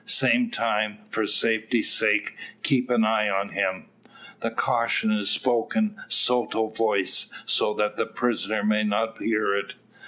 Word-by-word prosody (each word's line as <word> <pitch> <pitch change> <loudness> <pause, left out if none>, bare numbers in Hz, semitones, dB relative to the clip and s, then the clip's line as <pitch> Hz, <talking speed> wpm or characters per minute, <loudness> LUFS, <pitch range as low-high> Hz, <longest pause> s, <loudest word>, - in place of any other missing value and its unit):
Same 245 -2 +3
time, 110 - -1
for 110 - -1
safety's 110 +2 +2
sake, - - +1 0.3
keep 125 -2 +1
an 120 -3 +3
eye 110 -1 +1
on 100 0 -1
him." 95 -1 -2 0.5
The - - -2
caution 115 -2 0
is 105 -2 0
spoken 130 - +1
sotto 120 -3 +1
voce, 110 -3 0
so 105 - +1
that 105 0 -1
the - - -1
prisoner 110 -3 -2
may 105 0 +2
not 110 +2 -2
hear 110 -3 0
it. 100 0 -4
110 Hz, 145 wpm, -24 LUFS, 105-115 Hz, 0.5 s, Same